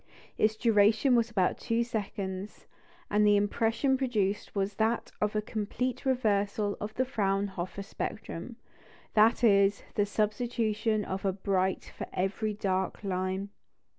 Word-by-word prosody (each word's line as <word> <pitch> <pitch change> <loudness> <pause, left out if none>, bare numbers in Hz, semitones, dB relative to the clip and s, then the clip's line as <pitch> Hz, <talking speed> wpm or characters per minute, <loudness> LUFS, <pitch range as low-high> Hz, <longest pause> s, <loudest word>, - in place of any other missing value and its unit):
" - - -22
Its 215 0 +3
duration 220 +3 +4
was 235 -1 +2
about 190 -5 +1
two 230 0 0
seconds, 200 -3 -5 0.5
and 210 0 +4
the 205 -1 +5
impression 225 +6 +1
produced 210 -7 -1
was 200 0 0
that 220 +4 0
of 210 0 0
a 210 - +1
complete 230 +5 -3
reversal 205 -4 +1
of 210 - -3
the 260 - +1
Fraunhofer 195 -4 -2
spectrum 215 +1 -5 0.6
that 225 +3 +4
is, 200 -2 +4
the 205 -1 +1
substitution 215 0 0
of 190 +1 -4
a 195 - +2
bright 190 -1 -1
for - - -5
every 200 +4 -1
dark 190 -1 -2
line. 190 +1 -2
210 Hz, 135 wpm, -29 LUFS, 195-225 Hz, 0.6 s, the